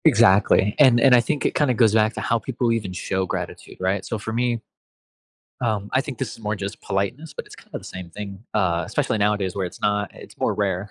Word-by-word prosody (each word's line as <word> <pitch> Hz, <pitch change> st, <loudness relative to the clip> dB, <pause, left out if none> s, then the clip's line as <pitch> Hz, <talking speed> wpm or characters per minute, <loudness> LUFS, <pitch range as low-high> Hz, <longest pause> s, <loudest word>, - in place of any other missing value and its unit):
Exactly, 100 Hz, +1 st, +5 dB
and 130 Hz, -5 st, +7 dB
and 130 Hz, +1 st, +6 dB
I 125 Hz, -, +8 dB
think 150 Hz, +4 st, -2 dB
it -, -, +2 dB
kinda 145 Hz, -4 st, +2 dB
goes 110 Hz, -2 st, +4 dB
back 110 Hz, +1 st, +3 dB
to -, -, -3 dB
how 115 Hz, -1 st, +1 dB
people 120 Hz, +1 st, -1 dB
even 110 Hz, -5 st, -1 dB
show 95 Hz, +1 st, -2 dB
gratitude, 90 Hz, -4 st, -5 dB
right? 95 Hz, +1 st, 0 dB
So 115 Hz, -, -3 dB
for 110 Hz, +2 st, -5 dB
me, 120 Hz, 0 st, 0 dB, 1.0 s
um, 105 Hz, -4 st, -1 dB
I 130 Hz, -, +4 dB
think 140 Hz, -3 st, -7 dB
this 130 Hz, -3 st, -3 dB
is -, -, -13 dB
more 105 Hz, -1 st, -2 dB
just 100 Hz, 0 st, -6 dB
politeness, 120 Hz, +11 st, -2 dB
but -, -, -6 dB
it's -, -, -13 dB
kind -, -, -18 dB
of -, -, -3 dB
the -, -, -14 dB
same 90 Hz, -2 st, -8 dB
thing, 100 Hz, +1 st, -8 dB
uh, 90 Hz, -5 st, +1 dB
especially 110 Hz, -, 0 dB
nowadays 100 Hz, -3 st, +1 dB
where 95 Hz, -2 st, -1 dB
it's 90 Hz, -, -8 dB
not 105 Hz, 0 st, 0 dB
it's -, -, -13 dB
more -, -, +1 dB
rare, 100 Hz, -1 st, -1 dB
105 Hz, 235 wpm, -23 LUFS, 95-120 Hz, 1.0 s, I